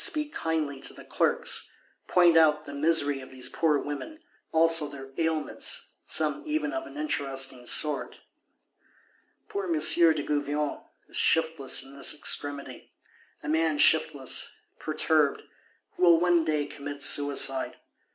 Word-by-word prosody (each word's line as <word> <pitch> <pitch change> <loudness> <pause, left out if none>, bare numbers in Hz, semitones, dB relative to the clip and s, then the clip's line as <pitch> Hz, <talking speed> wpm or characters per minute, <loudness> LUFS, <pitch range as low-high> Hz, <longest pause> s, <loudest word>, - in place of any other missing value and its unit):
speak 300 -1 +1
kindly 155 -4 -3
to - - -3
the - - -13
Clerks; - - +1 0.4
point 175 -2 +4
out 155 -1 +4
the 145 - -9
misery 145 -1 +1
of 130 - -12
these 130 -1 -4
poor 155 -3 +1
women; 145 - -6 0.3
also 165 -1 +4
their 135 -1 -11
ailments, 160 -1 -1
some 150 -2 +1
even 310 0 -2
of 330 0 -4
an - - -12
interesting 135 - -1
sort. 150 -2 +1 1.3
Poor 405 -2 -4
M. 340 - 0
de 165 - +4
Gouvion 145 0 -2 0.3
is - - -5
shiftless 160 -4 +2
in 135 +1 -12
this 140 +1 +1
extremity;—a 145 -1 -6
man 160 0 +1
shiftless, 145 -3 +1 0.2
perturbed; 155 -1 0 0.5
who - - -8
will 170 -2 +6
one 175 -1 +2
day 155 -2 -1
commit 145 0 -7
suicide. 140 -2 0
150 Hz, 130 wpm, -27 LUFS, 140-165 Hz, 1.3 s, will